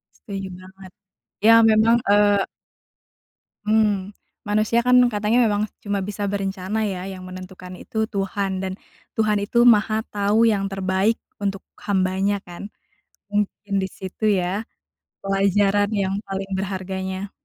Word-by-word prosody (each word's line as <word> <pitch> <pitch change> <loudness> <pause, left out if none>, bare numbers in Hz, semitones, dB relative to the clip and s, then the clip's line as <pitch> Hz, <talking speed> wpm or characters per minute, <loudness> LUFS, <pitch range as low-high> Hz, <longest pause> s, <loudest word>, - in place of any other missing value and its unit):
Setuju 195 -2 -6
banget, 190 0 -14 0.5
ya 225 - +8 0.2
memang, 220 +2 +5
eee 205 0 +5 1.3
Mmm, 210 -2 +1 0.3
manusia 215 +3 +2
kan 250 - +6 0.2
katanya 210 +2 +1
memang 205 -1 +1 0.2
cuma 205 -1 -1
bisa 205 +1 -4
berencana 195 +1 -2
ya, 185 -2 -4
yang 185 -1 -9
menentukan 185 0 -9
itu 220 +4 -3
Tuhan 200 -2 -2
dan 190 0 -3 0.4
Tuhan 215 -1 +2
itu 210 +4 -3
Maha 215 -1 +4
Tahu 210 +3 +2
yang 205 -3 +2
terbaik 195 +3 0 0.2
untuk 195 -1 -1 0.2
hamba-Nya 195 0 +1
kan. 180 +4 -9 0.6
Mungkin 205 0 -2
disitu 190 +2 -6
ya, 190 +4 -1 0.6
pelajaran 200 +1 +2
yang 195 -3 0
paling 195 0 -5
berharganya. 190 0 -4
200 Hz, 120 wpm, -22 LUFS, 190-210 Hz, 1.3 s, ya